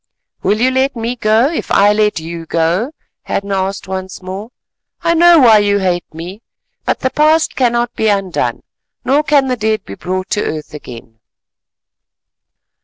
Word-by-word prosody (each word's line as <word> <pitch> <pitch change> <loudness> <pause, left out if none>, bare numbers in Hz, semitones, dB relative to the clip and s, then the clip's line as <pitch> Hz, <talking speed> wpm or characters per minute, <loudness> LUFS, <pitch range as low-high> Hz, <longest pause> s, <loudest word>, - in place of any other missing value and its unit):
"Will 210 +2 +1
you 255 +2 +3
let 265 +1 +1
me 230 +1 -3
go, 230 +4 +2
if - - -4
I 205 +1 +4
let 210 -3 +1
you 165 0 -7
go?" 170 - 0 0.3
Hadden 200 0 -3
asked 195 0 -2
once 190 0 -5
more. 190 +4 -6 0.5
"I 335 0 +3
know 340 +1 +6
why 230 -7 +7
you 205 0 +2
hate 180 -3 -1
me, 175 +7 -8 0.4
but - - -1
the 260 - 0
past 310 +1 +2
cannot 240 -1 +1
be 220 - -1
undone, 195 -4 -1 0.4
nor 280 +3 +3
can 290 -3 +2
the 255 - 0
dead 220 -1 -1
be 100 - -8
brought 185 - -4
to 210 - 0
earth 155 -1 -5
again." 115 -6 -11
210 Hz, 165 wpm, -15 LUFS, 185-250 Hz, 0.5 s, why